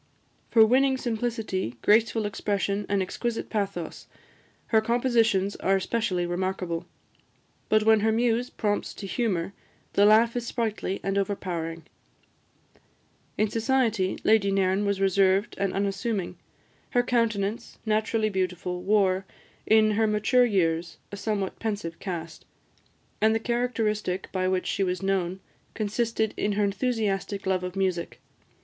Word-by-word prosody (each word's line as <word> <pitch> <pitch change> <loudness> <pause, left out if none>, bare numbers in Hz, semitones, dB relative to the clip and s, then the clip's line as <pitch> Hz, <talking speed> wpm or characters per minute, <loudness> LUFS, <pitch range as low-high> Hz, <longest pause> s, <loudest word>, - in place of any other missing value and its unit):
For 225 -1 +7
winning 265 +3 +3
simplicity, 225 - -2
graceful 225 0 +3
expression, 200 0 -1
and 200 -1 +2
exquisite 235 +5 -4
pathos, 195 -6 -3 0.6
her 220 -1 +4
compositions 230 -4 +2
are 195 - +2
especially 190 -2 -1
remarkable; 175 -1 -3 0.8
but 215 0 +4
when 220 0 +5
her 220 +1 +2
muse 235 +2 +1
prompts 205 -1 -2
to 200 - -7
humour, 195 -4 -1 0.4
the 200 +1 +5
laugh 225 +2 +5
is 240 -1 -3
sprightly 220 -5 -2
and 195 0 0
overpowering. 170 -4 -3 1.5
In 215 - +2
society, 225 -4 +1
Lady 215 -2 +4
Nairn 195 +1 +1
was 200 -1 0
reserved 195 +1 +2
and 195 -1 0
unassuming. 195 0 -2 0.5
Her 245 -2 +2
countenance, 230 -2 -1
naturally 215 0 +1
beautiful, 180 -2 -2
wore, 190 -1 +2 0.4
in 215 0 +5
her 220 +1 +2
mature 215 +4 +3
years, 170 -6 0
a - - -5
somewhat 200 -1 -3
pensive 205 -7 -4
cast; 170 -4 -6 0.8
and 220 +1 +4
the - - +1
characteristic 225 -5 -1
by 185 -1 0
which 185 0 0
she 195 - 0
was 185 0 -2
known 190 -1 -1 0.3
consisted 220 0 -1
in 205 - 0
her 205 +1 +1
enthusiastic 200 -2 -1
love 190 -1 0
of 180 0 -5
music. 185 -3 -2
205 Hz, 130 wpm, -26 LUFS, 190-225 Hz, 1.5 s, For